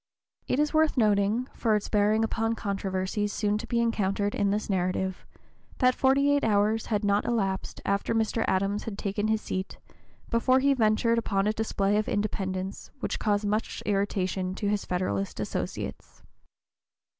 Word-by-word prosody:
It - - +1
is 300 +1 +1
worth 315 -2 +3
noting, 210 +2 +2
for 220 -3 +1
its 210 - -1
bearing 210 +1 +2
upon 225 0 0
controversies 200 0 -2
soon 210 0 0
to 230 - -7
be 235 - 0
encountered 205 -3 0
in 200 - +1
this 210 +2 -1
narrative, 190 -1 -1 0.5
that 255 0 +4
forty 275 +2 +3
eight 285 0 +2
hours 215 +1 +2
had 210 -2 0
not 200 0 +2
elapsed 195 -5 -2
after 200 +3 0
Mr. 225 0 +1
Adams 195 +2 0
had 215 -4 -5
taken 205 +1 -1
his 220 0 +1
seat 185 +1 -4 0.5
before 255 +2 +3
he 275 +1 +4
ventured 230 -1 +2
upon 195 -3 0
a 215 - +2
display 210 -2 0
of 215 - 0
independence 190 -2 -3
which - - -3
caused 205 -1 +1
much 210 +2 -2
irritation 190 -2 -1
to 205 - -2
his 205 -1 -1
Federalist 100 - -2
associates. - - -5
210 Hz, 160 wpm, -27 LUFS, 195-225 Hz, 0.5 s, that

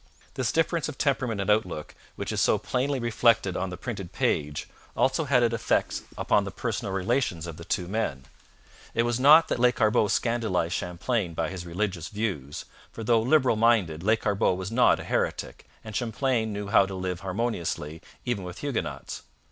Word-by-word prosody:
This 130 -2 -1
difference 165 -1 +1
of 145 - -8
temperament 130 -7 0
and 100 - -3
outlook, 90 -8 -1 0.2
which - - -4
is - - 0
so - - +4
plainly 135 +2 -1
reflected 115 -4 +2
on 95 +1 -2
the 90 - -6
printed 100 -4 -6
page, 75 0 -1 0.3
also 135 +4 +2
had 130 -3 +3
its 115 -1 +2
effect 115 - 0 0.2
upon - - +2
the - - -4
personal 95 - -3
relations 95 - 0
of 85 -2 -7
the 85 - -9
two 90 0 -2
men. 95 -10 -2 0.7
It 115 - +3
was 120 0 0
not 150 +5 +7
that - - -1
Lescarbot 115 -4 +3
scandalized 110 -9 0
Champlain 90 0 -2
by - - -1
his 90 -2 -7
religious 90 -2 -2
views, 95 -10 -4 0.3
for 115 - -7
though 115 0 +3
liberal 130 0 +3
minded, 105 -9 +2
Lescarbot 100 -2 +2
was 95 +2 -5
not 125 +2 +4
a - - -6
heretic, - - -2 0.2
and 110 -1 -8
Champlain 115 -1 0
knew 100 -1 -4
how 100 -1 +5
to 95 - -6
live 90 -1 -3
harmoniously 90 -6 -3 0.2
even 120 -6 -1
with 90 -1 -7
Huguenots. 85 - -4
105 Hz, 175 wpm, -27 LUFS, 90-120 Hz, 0.7 s, not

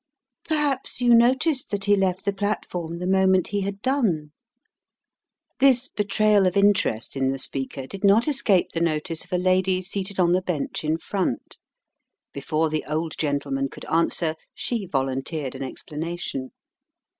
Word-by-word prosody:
"Perhaps 295 -6 -1
you 245 -1 +4
noticed 255 +4 +3
that 200 -1 -2
he 205 0 +5
left 190 -2 0
the 200 - +1
platform 180 -4 -3
the 180 - -4
moment 190 -1 +3
he 205 0 -1
had 200 +1 -4
done?" 200 - 0 1.3
This 265 -1 +4
betrayal 210 -1 +2
of 180 - 0
interest 200 - +2
in 135 -1 +1
the 135 0 0
speaker 135 0 -3
did 195 +8 -9
not 205 +6 +5
escape 220 - +2
the 165 - -2
notice 165 0 -1
of - - -19
a 180 - +2
lady 185 +1 +2
seated 195 +1 -4
on 175 -1 +4
the 180 +1 +3
bench 180 -5 -3
in 155 +1 0
front. 185 - -3 0.7
Before 155 +3 0
the 155 - -1
old 155 +1 -2
gentleman 140 -2 -1
could - - -10
answer 165 0 +1 0.2
she 225 -6 -3
volunteered 135 0 -2
an 135 - -8
explanation. 150 -1 -5
185 Hz, 155 wpm, -24 LUFS, 155-205 Hz, 1.3 s, he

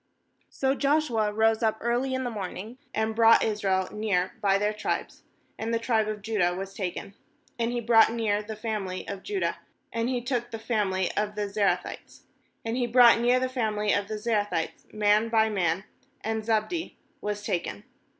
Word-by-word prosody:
16So 265 0 0
Joshuarose 225 -7 +2
up 220 -1 +1
early 245 +3 0
in 260 - -2
the 245 - -2
morn 200 -5 -5
ing, 220 +7 -8
and 220 0 -1
brought 230 0 +6
Israel 195 -3 0
near 200 -4 0
by 195 -1 +3
their 210 +1 0
tribes; 210 - -3 0.4
and 225 +1 -2
the 230 - +2
tribe 230 -2 +1
of 210 -2 -4
Judah 200 -5 +1
was 195 +1 -6
taken. 195 0 -5 0.5
17And 230 0 0
he 240 - -1
brought 225 -1 +5
near 220 -3 0
the 215 +1 -7
family 210 -4 -4
of 200 -1 -5
Judah; 400 -2 -2 0.3
and 230 +1 0
he 255 -1 0
took 240 -1 -2
the 225 - -5
family 205 -5 0
of 210 0 -1
the 210 -1 -1
Zerahites. 200 0 -2 0.4
And 225 +1 -1
he 245 -1 +1
brought 240 -1 +7
near 245 +2 +3
the 255 - 0
family 215 -5 0
of 200 0 0
the 215 0 -4
Ze 230 +3 -3
rahites 205 -6 -1
man 210 +1 +3
by 220 -1 +3
man; 180 -2 0 0.4
and 220 0 -2
Zabdi 225 +10 -1 0.3
was 210 0 -3
taken. 170 - -2
220 Hz, 180 wpm, -27 LUFS, 205-235 Hz, 0.5 s, brought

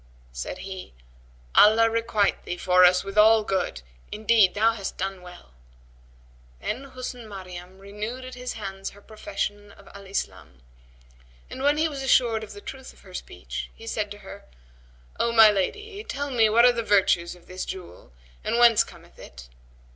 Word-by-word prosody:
Said - - -5
he, 190 - -8 0.6
"Allah 220 +2 +6
requite 225 -3 0
thee 180 - -5
for 180 0 +4
us 180 0 +5
with 195 +1 -1
all 220 +1 +6
good! 190 - -2 0.3
Indeed 215 -3 +3
thou 220 +2 +4
hast 200 -4 -6
done 190 0 -4
well." 180 - -13 1.1
Then 255 +6 -4
Husn 255 -3 -8
Maryam 185 -2 -9
renewed 210 +6 -6
at 255 - -9
his 250 0 -5
hands 195 -3 -6
her 200 - -16
profession 205 -3 -5
of 200 - -18
Al 200 -1 -12
Islam; 65 - -5 0.9
and, 260 - -7
when 290 +2 +3
he 315 +1 +2
was 285 -3 -6
assured 240 -4 +3
of 210 - -9
the 205 - -11
truth 265 +3 -9
of - - -21
her - - -16
speech, - - -7
he 225 - -13
said 215 -2 -2
to 205 - -8
her, - - -11 0.7
O 235 - +2
my 225 -2 +8
lady, 410 - -3
tell 285 -7 -4
me 225 -4 +4
what 235 +3 +5
are 245 - +6
the 235 - -1
virtues 190 -5 +2
of 175 - -20
this 185 0 -6
jewel 180 - -9 0.3
and - - 0
whence 235 -2 +6
cometh - - -17
it?" - - -12
210 Hz, 175 wpm, -25 LUFS, 190-235 Hz, 1.1 s, my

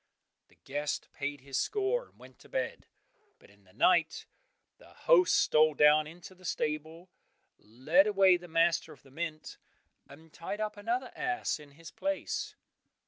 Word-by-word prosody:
The - - -26
guest 145 +2 -4
paid 140 -1 -4
his 135 0 -3
score, 430 +4 -1
and - - -31
went - - -16
to - - -18
bed, - - -4 0.5
but - - -21
in 100 -1 -25
the 95 - -22
night 170 -3 +2 0.5
the - - -18
host 425 -8 +4
stole 155 0 +4
down 150 +1 +5
into 175 +4 -12
the 185 0 -21
stable, 160 +2 -4 0.5
led 145 - +2
away 195 -3 +5
the 175 0 -12
master 165 0 +1
of 140 - -21
the 135 - -19
mint, 155 0 -6 0.5
and 155 +3 -16
tied 200 +5 -6
up 215 -1 -3
another 235 +5 -3
ass 245 -9 -2
in 145 -2 -15
his 165 +2 -12
place. 290 0 -3
165 Hz, 160 wpm, -30 LUFS, 150-205 Hz, 0.5 s, down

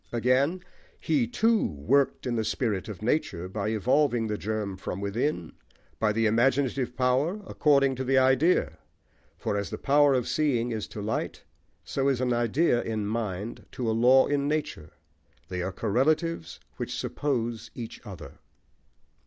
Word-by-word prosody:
Again 130 +9 +1 0.4
He, 255 -6 +1
too, 230 -2 +2
worked 130 - +1
in 125 -2 -1
the 110 - 0
spirit 110 -4 -1
of 105 0 -8
nature, 110 - -1
by 100 +2 -3
evolving 120 +3 +2
the 105 -1 -2
germ 105 -2 -3
from 95 0 -5
within, 100 - -2 0.5
by 110 -1 +2
the 115 +1 +1
imaginative 125 +2 +1
power, 130 +10 +1
according 140 -6 +3
to 130 - -2
the 135 +1 +2
idea. 130 - +3 0.6
For - - -2
as 100 -4 -2
the - - -5
power 145 0 +4
of 125 -2 0
seeing 125 -6 +1
is 110 -2 -3
to 105 - -7
light, 110 - -3 0.4
so 135 0 -1
is 135 -3 0
an 125 -1 +1
idea 120 +3 +2
in 110 -2 -3
mind 105 -1 -4
to 125 - -3
a - - +2
law 125 +4 +5
in 140 -1 0
nature. 150 - -3 0.6
They 90 -1 -3
are 95 +2 -2
correlatives 135 - 0 0.2
which - - -4
suppose 120 -5 -2
each 115 -2 -7
other. 80 - -10
120 Hz, 155 wpm, -27 LUFS, 105-140 Hz, 0.6 s, law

